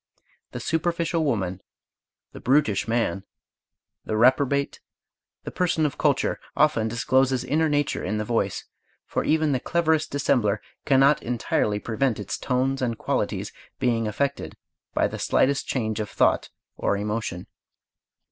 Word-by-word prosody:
The - - -6
superficial 165 0 0
woman, 95 -10 -1 0.7
the - - -10
brutish 130 -8 +2
man, 115 -4 0 0.8
the 110 - -2
reprobate, 135 +4 +3 0.6
the - - -6
person 175 -3 +1
of 145 - -3
culture, - - +1 0.2
often 150 -8 +3
discloses 130 +3 +1
inner 160 +2 +1
nature 145 -1 0
in 105 +4 -1
the 105 - -2
voice, 105 -4 -1 0.4
for - - -2
even 155 -1 +2
the 130 - +1
cleverest 160 +1 +1
dissembler 120 -7 +1 0.3
cannot 140 +1 +4
entirely 115 -3 0
prevent 115 +2 -1
its 100 - -4
tones 135 +1 0
and 120 -3 -1
qualities - - -2 0.3
being 115 -4 +1
affected 140 +6 -2 0.4
by - - +3
the - - -7
slightest 140 +1 +1
change 110 -4 -1
of 105 - -3
thought - - +2 0.3
or 100 - 0
emotion. 105 -3 -3
130 Hz, 135 wpm, -25 LUFS, 110-145 Hz, 0.8 s, cannot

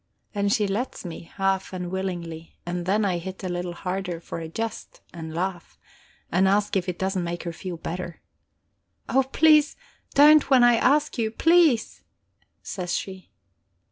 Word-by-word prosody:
And 200 -1 0
she 210 0 +2
lets 205 +3 -3
me, 170 -1 -8
half 195 -1 0
unwillingly, 175 -3 -5
and 175 0 -4
then 205 +2 +2
I 180 -3 0
hit 190 +2 -8
a 185 - -2
little 175 0 -3
harder, 180 -1 -3
for 170 - -7
a 165 - -6
jest, 225 +6 -5
and 160 -2 -7
laugh, 175 +1 -4 0.5
and 185 +3 +3
ask 200 +1 +2
if 190 -1 0
that 180 -1 -3
doesn't 190 -1 -1
make 170 0 -4
her 170 -1 -4
feel 180 0 -6
better. 170 +1 -6 0.9
"Oh, 270 - +3
please, 305 -1 +5 0.4
don't 300 +1 +7
when 260 -3 +6
I 240 0 +7
ask 285 +2 +2
you; 220 -1 +1
please," 320 -1 +3 0.6
says 180 -2 -3
she. 190 -1 -6
190 Hz, 160 wpm, -25 LUFS, 175-220 Hz, 0.9 s, don't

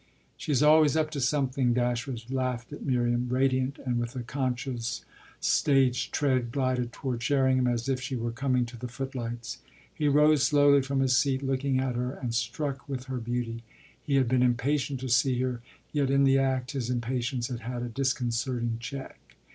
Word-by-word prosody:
"She's 145 -2 0
always 155 -1 +5
up 155 -1 0
to 145 -3 -3
something," 130 -2 +1
Dashwood 120 0 -1
laughed 130 -1 -2
as - - -8
Miriam, 120 -2 0
radiant 130 +1 +1
and 120 -2 0
with 120 +1 -4
a 125 - -4
conscious 130 -2 -3 0.3
stage 135 -2 +2
tread, 130 -5 0
glided 130 -2 0
toward 125 -3 -4
Sherringham 130 -1 +2
as 120 0 -1
if 130 -1 0
she 135 0 -3
were 115 -1 -2
coming 125 0 0
to 120 +1 -10
the 125 +2 -6
footlights. 120 -2 -5 0.3
He 150 - -1
rose 150 0 +5
slowly 145 0 +5
from 135 0 -1
his 130 -1 +3
seat, 135 0 +1
looking 135 0 0
at 130 -1 -1
her 125 +2 -2
and 120 -4 -4
struck 130 +5 -3
with 130 -2 -3
her 130 -1 -5
beauty: 120 -1 -3 0.4
he 140 - -1
had 135 -2 +3
been 125 +1 +2
impatient 130 +3 +1
to 130 - -3
see 125 +1 +3
her, 125 -2 -2 0.3
yet 145 -3 +1
in 140 0 +4
the 135 0 +5
act 130 -2 0
his 125 -4 -3
impatience 120 0 -2
had 125 -2 -4
had 120 +1 -5
a - - -3
disconcerting 120 -2 -1
check. 135 +3 -7
130 Hz, 180 wpm, -28 LUFS, 120-135 Hz, 0.4 s, always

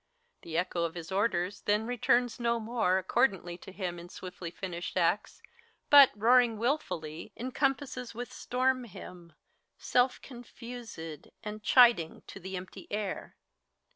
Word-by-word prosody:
The 160 -1 -4
echo 175 -1 0
of 170 0 -2
his 170 0 -7
orders 195 -1 0
tTien 210 +2 +1
returns 245 0 +1
no 235 -1 +1
more 220 -5 +1
Accordantly 185 -2 +1
to - - -11
him 180 -3 -4
in 175 +1 -11
swiftly 180 -1 -7
finished 175 -1 -5
acts, - - 0 0.5
But, 285 -2 +10
roaring 235 +1 +4
wilfully, 185 - -2
encompasses 260 -1 -2
with 245 +1 -6
storm 255 0 0
Him, 175 -5 -11 0.4
self 250 +1 +2
confused, 235 - -9 0.2
and 210 0 -6
chiding 235 -9 +5
to - - -10
the 190 0 -5
empty 180 +1 -9
air. 205 -2 -4
210 Hz, 135 wpm, -30 LUFS, 180-245 Hz, 0.5 s, But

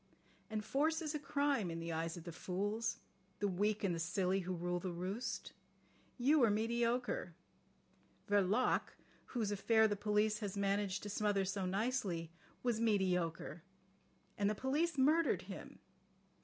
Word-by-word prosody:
And 215 -1 -3
force 310 +7 +2
is 315 -2 -3
a 300 - -2
crime 280 -9 +1
in 165 0 -4
the 165 0 -3
eyes 165 +2 -2
of 170 - -8
the 170 - -6
fools, 205 +6 -2 0.4
the 205 - 0
weak 205 +3 0
and 190 -3 +2
the 165 - -3
silly 180 +3 +1
who 185 0 -3
rule 175 +1 -1
the 185 - -3
roost. 185 +7 -4 0.6
You 280 +4 +4
are 230 - +6
mediocre. 235 - 0 0.9
Verloc, 205 +4 +2 0.3
whose 220 -5 -2
affair 220 +2 +4
the 205 - 0
police 210 +1 +1
has 205 -3 -4
managed 200 0 0
to 205 - -5
smother 205 -1 +1
so 190 0 -1
nicely, 195 -5 -1 0.3
was 240 -3 +1
mediocre. 180 -6 +1 0.8
And 205 0 +3
the 215 - 0
police 290 +7 0
murdered 310 +5 +3
him. - - -8
205 Hz, 150 wpm, -37 LUFS, 185-235 Hz, 0.9 s, are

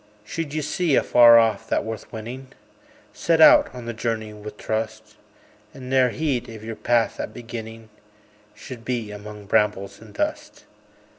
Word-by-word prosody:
Should 155 +5 -5
ye 155 - -1
see, 155 0 0
afar 120 -2 +7
off, 115 0 +2
that - - +1
worth 110 -1 -7
winning, 120 +4 -7 0.7
Set 165 -1 +1
out 160 - +7
on 125 -2 -9
the 120 - -4
journey 110 -1 -3
with 105 0 -10
trust; 110 -1 -4 0.6
And 130 -1 -9
ne'er 130 -1 +4
heed 135 -3 -2
if 110 -1 -10
your 115 0 -6
path 120 0 0
at - - -5
beginning 115 -2 -8 0.7
Should 125 -4 -10
be 115 -3 -3
among 105 0 -9
brambles 100 -2 0
and 110 -2 -14
dust. 100 - -4
115 Hz, 155 wpm, -23 LUFS, 110-125 Hz, 0.7 s, afar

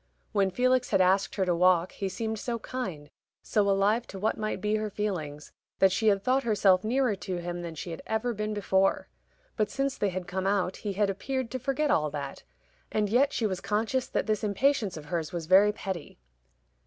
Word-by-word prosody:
When 195 -2 +2
Felix 255 +5 +2
had - - +3
asked 190 +2 +3
her 190 - +1
to 180 - +2
walk 180 0 +3
he 195 -2 -4
seemed 220 +3 -3
so 235 +1 -2
kind, 195 -11 -5 0.4
so 205 -3 +1
alive 205 +4 +2
to 195 - -8
what 210 +3 0
might 215 -2 -3
be 210 +2 0
her 215 0 -2
feelings, 165 -8 -4 0.3
that 190 0 +5
she 220 +4 0
had 200 -2 +3
thought 260 +3 +2
herself 200 -6 +3
nearer 245 +1 +1
to 185 -1 -4
him 175 0 -4
than 170 -2 -6
she 170 +3 -6
had 165 - -6
ever 220 +2 -1
been 215 0 -3
before; 195 -2 +1 0.5
but 215 -3 0
since 275 -1 -1
they 205 - +2
had 185 -1 -4
come 190 +1 -2
out 195 -2 0
he 205 -2 -4
had 200 0 +1
appeared 260 +5 -3
to 260 - -3
forget 275 +4 0
all 150 -1 +2
that. 140 -2 -6 0.5
And 210 -1 0
yet 275 +5 +4
she 230 - -1
was 190 -3 -2
conscious 225 +5 0
that - - -1
this 215 -1 -1
impatience 210 - +1
of 150 - -9
hers 165 0 -3
was 170 -2 -4
very 195 +4 +6
petty. 190 -6 -6
200 Hz, 210 wpm, -28 LUFS, 185-220 Hz, 0.5 s, very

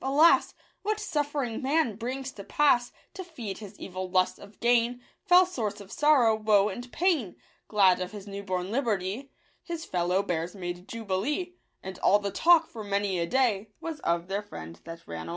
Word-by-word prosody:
Alas! 290 +5 +4 0.3
What 430 +1 -1
suffering 290 - -2
man 275 -4 +1
brings 260 +4 -4
to 200 - -10
pass 245 -1 +2 0.2
To 375 +2 -6
feed 245 - -7
his 205 -1 -11
evil 185 0 -5
lust 185 0 +1
of 200 0 -14
gain 240 +1 +2
— - - -44
Fell 365 0 +7
source 220 - -3
of 200 -1 -12
sorrow, 285 -7 +4
woe, 215 -2 +3
and 245 +5 -7
pain! 315 - +1 0.3
Glad 195 -4 +4
of 185 0 -4
his 205 -2 -9
new 200 -1 -6
born 185 -1 -3
liberty, 230 0 -1 0.3
His 335 -1 -6
fellow 180 +2 0
bears 175 -1 -3
made 175 -1 -6
jubilee; 230 - -2 0.3
And 190 -1 -7
all 205 - +5
the 200 -1 -3
talk, 335 - +5
for 220 - -8
many 200 -2 0
a 170 - 0
day, 225 -4 +1
Was 320 -2 -5
of 170 -6 -1
their 195 +2 -2
friend 85 - -10
that 165 0 -10
ran - - -6
away. - - -7
215 Hz, 190 wpm, -28 LUFS, 190-280 Hz, 0.3 s, Fell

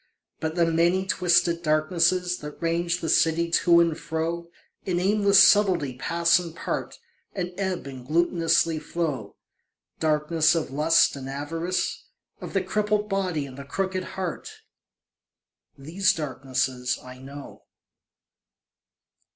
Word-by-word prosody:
But 160 0 -3
the 170 -1 +3
many 170 +3 +2
twisted 175 -2 +2
darknesses 175 +3 +1
That 150 0 -9
range 170 +1 -1
the 165 - -3
city 165 +2 +2
to 170 0 +4
and 170 -2 +2
fro, 165 +2 -4 0.3
In 180 -2 -1
aimless 200 +1 +5
subtlety 180 -11 +3
pass 170 +5 +2
and 170 -2 -8
part - - -4 0.4
And 180 -2 -4
ebb 190 -4 -3
and 130 -2 -9
glutinously 165 +1 +1
flow; 150 -11 -4 0.6
Darkness 155 +1 +2
of 160 -5 -2
lust 155 +4 +3
and 135 -1 -7
avarice, 165 +6 -3 0.4
Of - - -7
the 195 -2 +1
crippled 210 +2 -1
body 185 -7 -1
and 135 0 -11
the - - -6
crooked 185 +5 -3
heart... 185 -3 -4 1.3
These 170 +8 +1
darknesses 130 -4 -2
I 125 0 -11
know. 140 +2 -11
165 Hz, 125 wpm, -25 LUFS, 150-180 Hz, 1.3 s, aimless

